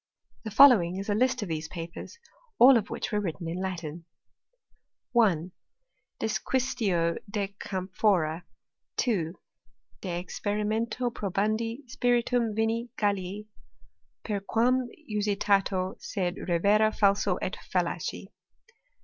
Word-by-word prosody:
The - - -2
following 215 -7 +7
is 195 +2 -5
a - - +3
list 250 +1 +1
of - - -5
these 160 -1 -3
papers, 170 - -8 0.4
all 260 +2 +8
of 215 -3 +1
which - - -4
were 210 - +1
written 170 -2 -4
in 170 +3 -3
Latin: 170 -3 -5 1.1
1. 190 - +2 0.7
Disquisitio 215 -6 0
de 200 -1 -3
camphora. 185 -3 0 0.5
2. 185 -9 0 0.7
De 190 - -5
experimento 220 +5 -2
probandi 220 +6 -2
spiritum 240 -2 +1
vini 225 +2 0
Gallici, 200 0 -1 0.8
per 210 -2 -2
quam 240 +5 +1 0.2
usitato, 200 -2 +1
sed 180 -4 -2 0.2
revera 205 +5 +4
falso 200 -1 +2
et - - -3 0.2
fallaci. - - -1
205 Hz, 105 wpm, -28 LUFS, 185-230 Hz, 1.1 s, all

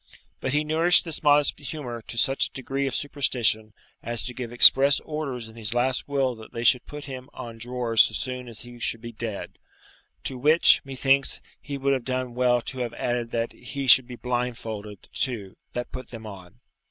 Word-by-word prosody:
But 130 - -2
he 150 +1 +2
nourished 165 +4 +4
this 165 -2 -3
modest 145 -1 +4
humour 140 -5 -6
to 115 - -7
such 135 +3 +2
a - - -22
degree 135 +1 -3
of 135 - -3
superstition 120 -6 -1 0.3
as 120 -1 -2
to 125 - -5
give 120 -2 -6
express 135 +3 +7
orders 140 -7 -5
in 110 - -13
his 115 0 0
last 125 +1 0
will 135 -3 +1
that 110 - -13
they 115 - -4
should 125 0 +3
put 150 0 -8
him 130 -1 -8
on 115 -1 -8
drawers 120 -1 +3
so - - -5
soon 125 -1 -4
as 115 -2 -4
he 120 0 -9
should 115 -1 -1
be 120 0 -7
dead; 110 -2 -6 0.6
to 130 -2 -4
which, 155 +5 +5
methinks, 135 0 +3 0.2
he 140 0 -5
would 140 0 +1
have 130 -3 -1
done 130 -1 -3
well 125 0 +2
to 130 - -6
have 120 -2 -3
added 120 -1 -2
that 115 0 -2
he 135 +3 -6
should 130 -1 +8
be 125 - -8
blindfolded, 115 -5 -4
too, 105 -8 -3 0.2
that 125 0 -4
put 130 - -8
them 115 -2 -9
on. 100 +1 -11
125 Hz, 200 wpm, -25 LUFS, 115-135 Hz, 0.6 s, should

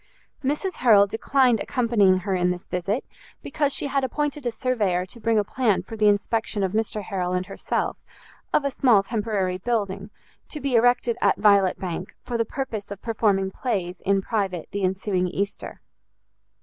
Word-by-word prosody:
Mrs 300 +8 -1
Harrel 215 -5 +6
declined 245 +3 +2
accompanying 225 -7 +2
her 195 - 0
in 180 -1 +2
this 180 0 -4
visit, 195 +6 -2 0.4
because 290 -2 0
she - - -1
had 275 -1 0
appointed 290 0 -2
a - - 0
surveyor 210 -7 0
to 210 +6 -11
bring 230 0 +1
a 210 - +3
plan 225 -2 0
for 225 - -8
the 215 -1 +3
inspection 205 0 +1
of 190 - 0
Mr 215 0 -1
Harrel 185 -2 -2
and 180 0 -1
herself, - - -2 0.5
of 285 - +2
a 280 - 0
small 240 -7 +4
temporary 200 -4 -1
building, 200 -3 -2 0.4
to 300 - -5
be 275 -2 -2
erected 240 0 +3
at 200 - +3
Violet 200 -3 +4
Bank, 180 0 -5
for 245 - -5
the 230 -1 +1
purpose 225 -5 -5
of 200 -1 -7
performing 205 -4 +1
plays 185 -7 -3
in 195 0 +1
private 195 -7 -2
the 200 - -3
ensuing 185 0 0
Easter. 200 +2 -4
210 Hz, 175 wpm, -24 LUFS, 190-240 Hz, 0.5 s, Harrel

